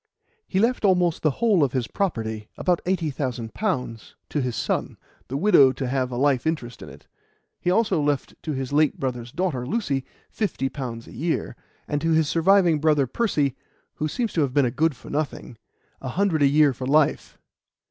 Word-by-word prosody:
He 190 - -2
left 230 +5 +2
almost 180 -4 +2
the 155 - +3
whole 205 - +2
of 135 - 0
his 130 -3 0
property 110 - -3
about 180 -2 +1
eighty 175 -5 0
thousand 125 -4 -4
pounds 125 - -3
to 150 - -1
his 125 -2 -2
son, - - -2 0.3
the 135 - -3
widow 145 -6 +6
to 135 - -4
have 130 0 0
a 120 - -5
life 140 +1 +2
interest 125 -7 -3
in 75 - -9
it. 70 +2 -14 0.5
He - - -1
also 205 -4 +2
left 145 -2 -1
to 155 - -3
his 135 0 -4
late 150 -1 +2
brother's 125 -2 -3
daughter, 160 -6 -1
Lucy, 140 - -1 0.3
fifty 190 -11 -2
pounds 120 -5 -6
a - - -13
year, 160 +7 -2 0.3
and 145 -1 -1
to 165 0 +1
his 160 -1 +3
surviving 170 0 +4
brother 150 -2 +3
Percy, 145 - 0 0.4
who 155 - -1
seems 230 - -2
to 165 - +1
have 135 -2 -1
been 140 -2 +4
a 120 - 0
good 160 +2 +1
for - - -12
nothing, 145 -4 -3 0.5
a 130 - -5
hundred 180 0 +1
a 140 - +6
year 145 0 +4
for 130 +1 -6
life. 150 +1 +2
145 Hz, 195 wpm, -24 LUFS, 130-170 Hz, 0.5 s, widow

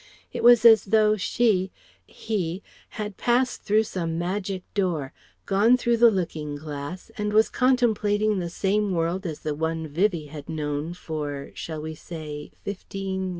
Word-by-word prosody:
It - - -3
was 240 -1 +7
as 225 -1 +8
though 215 +1 +4
she 190 -2 +1 0.4
he 190 -4 -3 0.3
had 210 -3 -4
passed 250 +1 +1
through 215 +2 +3
some 170 -6 -3
magic 185 +2 -3
door, 165 -8 -1 0.3
gone 210 +6 +4
through 240 -1 +1
the 235 0 +7
looking 160 -7 -3
glass 150 +6 -7
and 210 0 -1
was 215 +1 +4
contemplating 215 -5 +2
the 175 -1 -3
same 200 +3 0
world 170 +3 -1
as 155 -3 -6
the 155 - -2
one 160 +1 -2
Vivie 165 -1 0
had 150 0 -9
known 150 +1 -3
for 150 -5 -5
shall 155 -2 -6
we 160 0 -5
say 150 -2 -8
fifteen? 190 -1 -4
185 Hz, 150 wpm, -25 LUFS, 160-210 Hz, 0.4 s, as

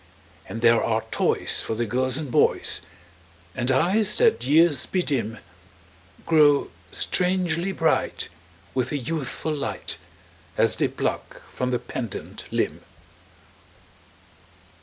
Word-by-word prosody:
And 115 - -5
there 115 -1 +5
are 110 -1 0
toys - - +1
for 110 - -3
the 120 +1 -1
girls 130 +3 +1
and 150 -5 -4
boys; - - +2 0.7
And 125 0 -2
eyes 190 +10 +3
that 220 - +3
years 150 +2 +4
bedim 130 - -1 0.9
Grow 150 -3 +4 0.2
strangely 180 -1 0
bright, 165 -4 0 0.5
with 130 -2 -1
a 145 - 0
youthful 155 +2 -3
light, 140 -2 -3 0.6
As - - +3
they - - +2
pluck - - -4
from 125 - -2
the 125 - +1
pendant 120 -2 -6
limb. - - -1
140 Hz, 115 wpm, -24 LUFS, 120-165 Hz, 0.9 s, there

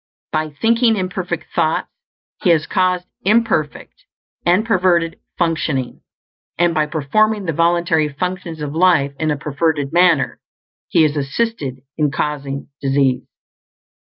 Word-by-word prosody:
By 155 0 -1
thinking 225 - +2
imperfect 185 -1 -4
thoughts - - +1 0.5
he 185 - +2
has 160 -2 +4
caused 180 -1 +1 0.2
imperfect 205 -8 0 0.4
and 185 +5 +3
perverted 180 -6 +2 0.2
functioning; 155 -7 -1 0.6
and 175 0 +3
by 155 -1 +1
performing 200 +8 +1
the 165 - -1
voluntary 170 -1 +2
functions 175 +1 -4
of 145 -1 -4
life 160 -5 +3
in 155 -1 0
a 150 - 0
perverted 145 0 -1
manner, 175 -6 +3 0.5
he 160 - +3
has 150 -1 +1
assisted 140 - -2 0.2
in 150 -1 +3
causing 140 -1 -3
disease. 135 -2 +1
165 Hz, 125 wpm, -19 LUFS, 145-185 Hz, 0.6 s, has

